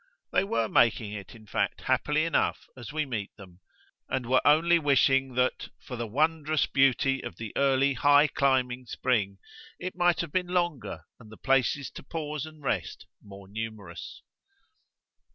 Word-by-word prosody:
They -, -, +3 dB
were 115 Hz, -, 0 dB
making 110 Hz, -2 st, +2 dB
it 100 Hz, +2 st, -8 dB
in 110 Hz, -1 st, -15 dB
fact 100 Hz, -, -2 dB
happily 155 Hz, +1 st, +1 dB
enough 165 Hz, -, 0 dB
as 125 Hz, +2 st, -9 dB
we 155 Hz, 0 st, -1 dB
meet 110 Hz, -7 st, -4 dB
them, 95 Hz, -4 st, -14 dB, 0.5 s
and 130 Hz, -2 st, -2 dB
were 130 Hz, +2 st, +3 dB
only 165 Hz, +4 st, +5 dB
wishing 135 Hz, -3 st, +2 dB
that, 125 Hz, 0 st, 0 dB
for 125 Hz, -, -8 dB
the 120 Hz, -1 st, -4 dB
wondrous 155 Hz, +4 st, +1 dB
beauty 135 Hz, 0 st, +2 dB
of 120 Hz, -, -7 dB
the 110 Hz, -3 st, -7 dB
early 140 Hz, 0 st, +3 dB
high 145 Hz, +3 st, +5 dB
climbing 130 Hz, -4 st, 0 dB
spring, 105 Hz, -6 st, -1 dB, 0.4 s
it 185 Hz, +1 st, -6 dB
might 175 Hz, -1 st, +2 dB
have 170 Hz, -3 st, -6 dB
been 180 Hz, +1 st, 0 dB
longer 175 Hz, -5 st, -2 dB, 0.2 s
and 110 Hz, -3 st, -15 dB
the 110 Hz, -, -12 dB
places 135 Hz, +1 st, +1 dB
to -, -, -9 dB
pause 150 Hz, 0 st, -5 dB
and 155 Hz, -2 st, -14 dB
rest 95 Hz, -11 st, -3 dB, 0.2 s
more 100 Hz, -1 st, -13 dB
numerous. 105 Hz, -4 st, -7 dB
135 Hz, 160 wpm, -28 LUFS, 115-150 Hz, 0.5 s, only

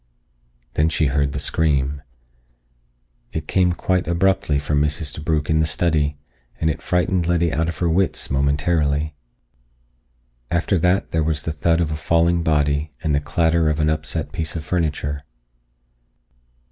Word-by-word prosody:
Then 80 Hz, +2 st, +2 dB
she 80 Hz, -, +1 dB
heard 70 Hz, -1 st, +1 dB
the 70 Hz, -, -4 dB
scream. 70 Hz, -2 st, 0 dB, 1.3 s
It 80 Hz, -1 st, -4 dB
came 90 Hz, -2 st, +2 dB
quite 90 Hz, +1 st, 0 dB
abruptly 85 Hz, -3 st, +2 dB
from 75 Hz, +1 st, 0 dB
Mrs. 75 Hz, 0 st, -1 dB
DeBrugh 75 Hz, -1 st, -1 dB
in 80 Hz, 0 st, +2 dB
the 80 Hz, -, +2 dB
study, 75 Hz, -2 st, +1 dB, 0.4 s
and 80 Hz, 0 st, +2 dB
it -, -, -6 dB
frightened 90 Hz, -1 st, 0 dB
Letty 85 Hz, -2 st, +1 dB
out 80 Hz, +3 st, 0 dB
of 85 Hz, -, -5 dB
her 85 Hz, -, 0 dB
wits 90 Hz, +3 st, 0 dB
momentarily. 70 Hz, +2 st, +1 dB, 1.4 s
After 85 Hz, +2 st, +1 dB
that 90 Hz, +4 st, +1 dB
there 80 Hz, -, +1 dB
was 75 Hz, -1 st, -1 dB
the 80 Hz, -, -2 dB
thud 80 Hz, +2 st, +1 dB
of 80 Hz, -3 st, 0 dB
a -, -, -1 dB
falling 85 Hz, +2 st, +2 dB
body 75 Hz, -1 st, +1 dB
and 75 Hz, -, 0 dB
the 70 Hz, -, +3 dB
clatter 80 Hz, +1 st, +1 dB
of 75 Hz, 0 st, -1 dB
an 75 Hz, 0 st, +2 dB
upset 75 Hz, 0 st, -3 dB
piece 80 Hz, 0 st, -3 dB
of 80 Hz, -3 st, -5 dB
furniture. 75 Hz, -4 st, -2 dB
80 Hz, 155 wpm, -21 LUFS, 75-85 Hz, 1.4 s, the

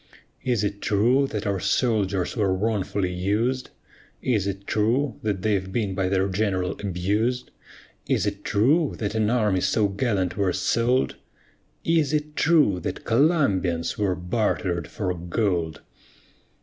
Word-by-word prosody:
Is 120 Hz, -5 st, +1 dB
it 100 Hz, 0 st, -2 dB
true 120 Hz, +7 st, +3 dB
that 105 Hz, -4 st, -4 dB
our 100 Hz, -2 st, 0 dB
soldiers 100 Hz, -5 st, 0 dB
were 100 Hz, -5 st, +1 dB
wrongfully 100 Hz, -2 st, -1 dB
us'd? 110 Hz, +8 st, 0 dB, 0.5 s
Is 105 Hz, -6 st, +1 dB
it 100 Hz, 0 st, -4 dB
true 115 Hz, +5 st, 0 dB
that 100 Hz, -4 st, -2 dB
they've 95 Hz, -3 st, 0 dB
been 100 Hz, -2 st, -1 dB
by 95 Hz, 0 st, 0 dB
their 95 Hz, 0 st, +1 dB
GENERAL 95 Hz, -2 st, 0 dB
abus'd? 105 Hz, +6 st, -1 dB, 0.6 s
Is -, -, +1 dB
it -, -, -3 dB
true 140 Hz, +9 st, +2 dB
that 105 Hz, -2 st, -2 dB
an 110 Hz, -1 st, +1 dB
army 105 Hz, -6 st, +2 dB
so 100 Hz, +3 st, +2 dB
gallant 100 Hz, -3 st, -1 dB
were 95 Hz, -3 st, +1 dB
sold? 115 Hz, +7 st, +1 dB, 0.7 s
Is 160 Hz, -3 st, +2 dB
it 150 Hz, 0 st, -1 dB
true 150 Hz, -, +3 dB
that -, -, -5 dB
COLUMBIANS 105 Hz, -, +1 dB
were 100 Hz, -3 st, +1 dB
barter'd 90 Hz, -3 st, -1 dB
for 95 Hz, -4 st, -3 dB
gold? 85 Hz, -2 st, -1 dB
105 Hz, 135 wpm, -24 LUFS, 95-120 Hz, 0.7 s, true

